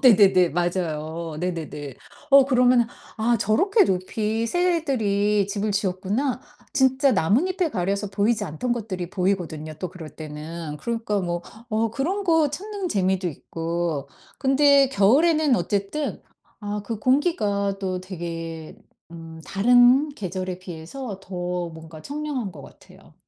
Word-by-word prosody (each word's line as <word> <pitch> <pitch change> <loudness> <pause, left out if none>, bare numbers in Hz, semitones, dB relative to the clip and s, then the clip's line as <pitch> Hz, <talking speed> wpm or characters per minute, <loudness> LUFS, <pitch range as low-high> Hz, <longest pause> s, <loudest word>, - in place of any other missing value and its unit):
네네네. 195 -7 +6
맞아요. 165 -2 -2
네네네. 160 -5 -4 0.4
어 275 -1 +8
그러면은 250 -2 +4 0.3
'아 235 +1 +2
저렇게 380 - +3
높이 215 - -1
새들이 225 - +1
집을 205 +1 -2
지었구나.' 205 +7 -1 0.3
진짜 265 0 +3
나뭇잎에 305 - +1
가려서 200 0 -1
보이지 210 +3 +1
않던 160 +12 -2
것들이 195 -7 -4
보이거든요, 175 -5 -2
또 185 - -3
그럴 170 -3 -10
때는. 155 +1 -7
그러니까 225 -3 -2
뭐 175 -1 -2 0.3
어 220 0 0
그런 340 - -2
거 325 -5 +3
찾는 395 +4 -4
재미도 190 - +1
있고. 165 -2 -3 0.3
근데 275 0 +5
겨울에는 285 +7 +4
어쨌든 205 +10 -2 0.4
아 205 -1 -4
그 225 0 -4
공기가 210 - +1
또 185 -2 -2
되게 165 -3 -6 0.4
음 165 -1 -10
다른 245 +7 +5
계절에 185 - -4
비해서 185 +5 -7
더 180 -2 -3
뭔가 160 -1 -11
청량한 285 -7 -4
것 145 -4 -11
같아요. - - -17
200 Hz, 280 characters per minute, -24 LUFS, 175-255 Hz, 0.4 s, 어